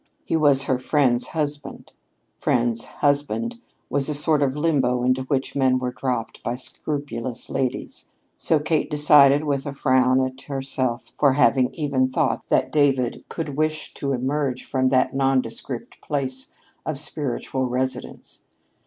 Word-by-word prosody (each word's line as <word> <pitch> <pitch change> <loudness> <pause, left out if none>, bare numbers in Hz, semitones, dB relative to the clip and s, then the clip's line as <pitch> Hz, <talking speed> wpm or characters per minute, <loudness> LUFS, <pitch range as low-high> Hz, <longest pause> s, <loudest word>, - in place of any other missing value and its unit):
He - - 0
was 145 -4 +4
her 130 -2 0
friend's 130 -3 +2
husband. 145 -3 -4 0.5
"Friend's 120 -1 +1
husband" 145 +12 -1 0.3
was 140 +1 -1
a 150 - -1
sort 150 0 +2
of 135 -1 +1
limbo 135 -6 +1
into 130 +1 +2
which 135 0 -1
men 130 -2 +3
were 125 -1 -2
dropped 125 -2 -3
by 120 - -2
scrupulous 130 -2 -5
ladies; 130 -2 -3 0.3
so 160 - +1
Kate 155 +1 0
decided, 145 -1 +5
with 140 -2 -1
a 140 - -4
frown 130 -1 +3
at 130 0 -3
herself 135 -3 -3
for 140 -3 +5
having 130 -1 +3
even 140 -4 +1
thought 130 - 0
that - - +1
David 135 -5 +2
could 155 -4 -4
wish 155 +1 -1
to 140 - -3
emerge 130 0 -1
from 130 -1 +1
that 130 -1 +2
nondescript 135 -2 -1
place 130 -3 -3 0.3
of 155 -3 -3
spiritual 135 -3 -2
residence. 130 +1 -4
135 Hz, 145 wpm, -23 LUFS, 130-145 Hz, 0.5 s, decided